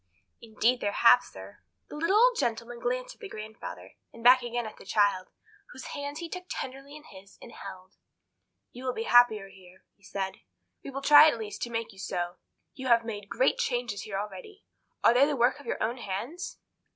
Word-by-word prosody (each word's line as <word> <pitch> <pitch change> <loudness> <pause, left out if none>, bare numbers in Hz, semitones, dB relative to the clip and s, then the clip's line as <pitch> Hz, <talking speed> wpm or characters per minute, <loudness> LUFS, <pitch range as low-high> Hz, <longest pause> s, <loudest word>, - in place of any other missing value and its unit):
"Indeed 230 +2 0
there 205 0 -1
have, - - +6
sir." - - -12 0.3
The - - -8
little 335 +7 +2
old - - +5
gentleman 235 -1 -2
glanced - - -2
at - - -27
the 410 - -7
grandfather, 215 - -9 0.2
and 230 - -13
back 250 +1 +7
again 240 0 -3
at 215 - -9
the - - -13
child, 200 -2 +1 0.4
whose 260 - -9
hand 285 +1 -5
he 340 +1 -5
took 365 +2 -7
tenderly 275 +2 -6
in 300 - -12
his 195 -6 -15
and 235 - -12
held. 190 -2 -11 0.7
"You 250 +2 -10
will 255 - 0
be 225 - -2
happier 230 -4 +5
here," 190 -1 -18
he - - -38
said, 195 -1 -4 0.5
"We - - -7
will 275 0 -6
try, 295 +1 +9
at 265 - -2
least, 215 -2 -7
to 240 - -2
make 230 -1 -4
you 190 - -16
so. 175 -2 -3 0.4
You 260 -1 -6
have 235 -2 +4
made 205 -3 -6
great 260 - +1
changes 240 -5 -1
here 195 -2 -5
already. 210 - -8 0.4
Are - - +6
they 265 +4 +5
the 295 - -1
work 245 +3 +2
of 285 - -14
your - - -2 0.2
hands?" 235 - -5
235 Hz, 200 wpm, -28 LUFS, 205-275 Hz, 0.7 s, try